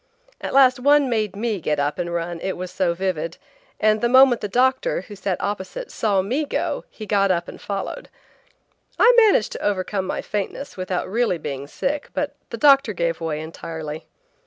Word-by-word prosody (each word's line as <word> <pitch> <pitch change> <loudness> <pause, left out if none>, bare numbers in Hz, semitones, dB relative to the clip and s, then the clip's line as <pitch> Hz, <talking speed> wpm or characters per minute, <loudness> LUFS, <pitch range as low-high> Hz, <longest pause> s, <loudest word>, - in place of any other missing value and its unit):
At - - -4
last 255 -2 +6
one 285 0 +4
made 215 -4 0
me 215 -1 -2
get 150 -1 0
up 145 +4 -1
and 175 -1 -2
run, 170 0 -3
it 190 - -3
was 180 0 -6
so 185 -2 0
vivid, 170 -3 -2 0.4
and 215 0 +3
the 240 - +2
moment 260 -1 +6
the 210 - -2
doctor, 255 0 +1
who 205 +2 -11
sat 195 -2 -2
opposite, 205 - -4
saw 200 -4 +1
me 255 +10 -1
go 400 - -2
he 215 - -9
got 200 -2 +2
up 175 -2 0
and - - -10
followed. 200 - -5 0.9
I 485 - +6
managed 435 - +5
to - - -6
overcome 195 -1 -1
my - - -3
faintness 210 +7 -4
without 185 -1 -3
really 220 -2 +1
being 140 -3 -5
sick, 280 - -3
but - - -2
the - - -5
doctor 275 -6 +5
gave 170 -2 -1
way 155 -2 -2
entirely. 160 -1 -7
200 Hz, 185 wpm, -22 LUFS, 175-250 Hz, 0.9 s, last